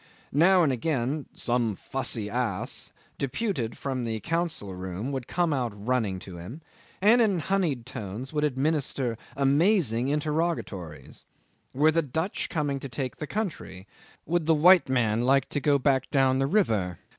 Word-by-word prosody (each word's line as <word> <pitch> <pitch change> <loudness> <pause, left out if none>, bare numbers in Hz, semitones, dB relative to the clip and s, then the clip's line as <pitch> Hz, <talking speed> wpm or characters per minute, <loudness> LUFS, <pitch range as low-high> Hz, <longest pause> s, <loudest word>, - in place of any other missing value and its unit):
Now 175 +5 +5
and 140 -4 +2
again 135 +2 -1
"some 120 -3 0
fussy 115 -2 -1
ass" 115 -4 -2 0.3
deputed 140 - -2
from 130 -3 -3
the 110 -1 -2
council 165 - -2
room 95 +7 -5
would 130 -3 -4
come 175 -3 +1
out 125 -5 -1
running 115 -6 0
to 90 -3 -9
him, 105 - -9 0.4
and 230 +4 +6
in 205 -5 +3
honeyed 160 -8 0
tones 115 +2 -6
would 150 -1 0
administer 140 -3 0 0.2
amazing 140 - +3
interrogatories: 150 - -3 0.5
"Were 150 +4 +4
the 165 +1 +2
Dutch 160 +6 -2
coming 145 -3 -1
to 135 - -7
take 130 0 -4
the 150 - -5
country? 170 - -4 0.4
Would 170 -1 0
the 165 - +5
white 175 +1 +6
man 115 -4 +2
like 135 +2 +3
to 145 - -1
go 145 0 +3
back 135 -1 +1
down 135 -1 +3
the 135 - +1
river? 110 - +1
135 Hz, 155 wpm, -27 LUFS, 120-160 Hz, 0.5 s, and